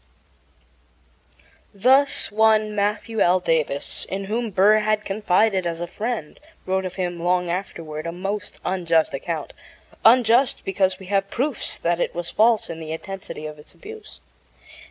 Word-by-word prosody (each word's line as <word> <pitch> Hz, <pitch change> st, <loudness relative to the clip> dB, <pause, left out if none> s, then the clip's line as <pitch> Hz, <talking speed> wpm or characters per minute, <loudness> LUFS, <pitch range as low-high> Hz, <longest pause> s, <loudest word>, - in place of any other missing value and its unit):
Thus 265 Hz, +6 st, +4 dB
one 215 Hz, 0 st, +3 dB
Matthew 210 Hz, +2 st, -1 dB
L. 180 Hz, +1 st, +4 dB
Davis, 155 Hz, -5 st, -1 dB
in 195 Hz, +1 st, -3 dB
whom 225 Hz, +4 st, -2 dB
Burr 205 Hz, +2 st, +4 dB
had 215 Hz, 0 st, 0 dB
confided 195 Hz, -1 st, +1 dB
as 165 Hz, -1 st, -4 dB
a 175 Hz, -, -3 dB
friend, 215 Hz, -4 st, -5 dB, 0.3 s
wrote 190 Hz, 0 st, -1 dB
of 185 Hz, -, -5 dB
him 175 Hz, -2 st, -3 dB
long 180 Hz, 0 st, +1 dB
afterward 165 Hz, -4 st, -5 dB
a -, -, -3 dB
most 195 Hz, +4 st, -5 dB
unjust 170 Hz, -4 st, +1 dB
account -, -, -4 dB, 0.5 s
unjust 240 Hz, +2 st, +4 dB
because 190 Hz, -1 st, +1 dB
we 190 Hz, -, -12 dB
have 195 Hz, +1 st, 0 dB
proofs 270 Hz, 0 st, -2 dB
that 170 Hz, 0 st, -1 dB
it -, -, -2 dB
was 175 Hz, 0 st, -4 dB
false 225 Hz, 0 st, +3 dB
in 165 Hz, -1 st, -7 dB
the 160 Hz, -1 st, -7 dB
intensity 185 Hz, -1 st, -7 dB
of 150 Hz, -1 st, -8 dB
its 150 Hz, -, -14 dB
abuse. 435 Hz, +1 st, -12 dB
195 Hz, 150 wpm, -23 LUFS, 175-215 Hz, 0.5 s, Thus